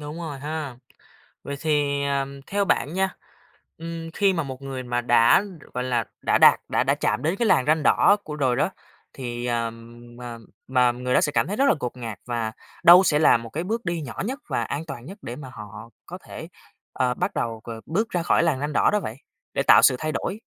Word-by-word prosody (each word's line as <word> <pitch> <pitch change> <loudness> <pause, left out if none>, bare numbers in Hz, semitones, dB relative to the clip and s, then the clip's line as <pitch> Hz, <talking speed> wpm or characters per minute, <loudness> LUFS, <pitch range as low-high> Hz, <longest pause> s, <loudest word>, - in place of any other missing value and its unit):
Đúng 150 +3 -7
rồi 155 -5 -6
ha! 150 -2 -5 0.7
Vậy 140 - -5
thì, 145 -2 +1
à, 140 -1 0 0.2
theo 200 0 0
bạn 150 -3 0
nha, 190 0 0 0.6
ừm, 165 0 -6
khi 195 -1 +2
mà 165 -3 -1
một 135 0 -8
người 135 -2 -5
mà 120 0 -1
đã, 120 - +5 0.3
gọi 125 0 -2
là, 120 -4 0 0.2
đã - - +2
đạt, - - +7
đã - - +2
đã - - +2
chạm - - -1
đến 165 +5 +1
cái 235 - 0
làn 130 -10 +3
ranh 155 0 +2
đỏ 205 - +5
của 150 - -6
rồi 130 -4 +1
đó. - - +1 0.4
Thì, 120 -2 -5
à, 115 -1 0 0.5
mà 120 -1 -7 0.3
mà 125 -2 +3
người 125 +1 -3
đó - - +4
sẽ 145 - +1
cảm 155 - +1
thấy 205 - -3
rất 275 - +2
là - - +5
ngột 125 0 -4
ngạt, 115 -5 -6
và 115 -2 -2 0.3
đâu 180 +2 +9
sẽ 150 -4 +2
là 155 - +6
một 115 0 -9
cái 160 +7 -4
bước 225 +4 -3
đi 170 -1 -2
nhỏ 135 -5 -6
nhất 265 +6 -4
và - - -1
an 145 +3 -4
toàn 120 -3 -7
nhất 195 +5 -9
để 120 - -6
mà 135 -3 -9
họ 105 +1 -10 0.2
có - - -8
thể, - - -9 0.5
ờ, 125 -1 +1
bắt - - -2
đầu 115 -1 -3
c - - -25 0.2
bước 215 +9 -1
ra 175 -2 -1
khỏi 170 - +3
làn 150 -6 +1
ranh 145 +1 -3
đỏ - - +4
đó 210 - +2
vậy, 110 - -6 0.4
để - - 0
tạo - - +7
sự 130 - +6
thay 155 0 -2
đổi? 200 +7 -3
140 Hz, 235 wpm, -24 LUFS, 125-165 Hz, 0.7 s, đâu